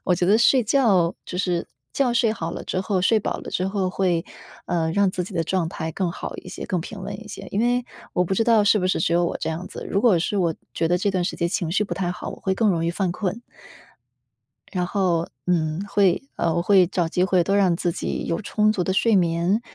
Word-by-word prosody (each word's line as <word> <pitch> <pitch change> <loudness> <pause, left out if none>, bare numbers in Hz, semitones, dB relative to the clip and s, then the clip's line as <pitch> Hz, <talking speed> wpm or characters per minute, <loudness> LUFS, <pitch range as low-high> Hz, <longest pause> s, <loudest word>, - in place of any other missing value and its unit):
我 180 - +3
觉 175 - 0
得 205 +5 +4
睡 250 +2 +5
觉 210 -8 +3
就 180 - -6
是 180 -2 -1 0.3
觉 265 -3 +1
睡 230 -2 +3
好 165 -6 -4
了 - - -6
之 185 - -2
后， 190 0 0
睡 220 +4 +4
饱 210 - -3
了 - - -8
之 185 - -1
后 195 -1 -1
会， 180 -3 0 0.4
呃， 165 -2 0
让 200 +1 +3
自 180 -1 -3
己 190 - -10
的 165 - +1
状 170 0 -1
态 160 -1 -4
更 175 +1 -2
好 - - -6
一 - - -10
些， - - -7
更 180 - -1
平 195 +4 -8
稳 - - -5
一 225 - -12
些。 - - -8
因 200 - 0
为 245 +1 +1 0.3
我 180 - +2
不 190 - -1
知 225 - +1
道 225 -2 +5
是 205 +1 +4
不 185 - 0
是 185 - +1
只 170 - +1
有 175 +1 +3
我 170 - -1
这 - - -2
样 165 +3 -5
子， - - -8
如 200 - +1
果 215 -6 +4
是 175 +5 -1
我 170 -4 +1 0.2
觉 165 - 0
得 175 +2 +2
这 200 +3 +1
段 185 -2 0
时 180 - -2
间 170 - -1
情 175 -3 -2
绪 205 - +2
不 - - -4
太 180 -2 -2
好， 180 - -7
我 - - -8
会 190 - 0
更 220 +2 +2
容 165 -3 0
易 - - +1
犯 185 +1 -1
困。 195 +5 -3 1.3
然 180 -2 -1
后， 180 -3 0 0.2
嗯， 160 -1 0
会 195 -4 +3
呃， 165 -1 0
我 170 - +1
会 185 0 +5
找 175 -2 0
机 180 +2 0
会 185 -2 +3
多 195 +3 +1
让 190 -4 +3
自 175 0 -1
己 - - -3
有 165 - -2
充 215 +1 +2
足 190 -4 -1
的 190 - -1
睡 225 +3 +3
眠， 175 +3 +2
185 Hz, 280 characters per minute, -23 LUFS, 170-205 Hz, 1.3 s, 睡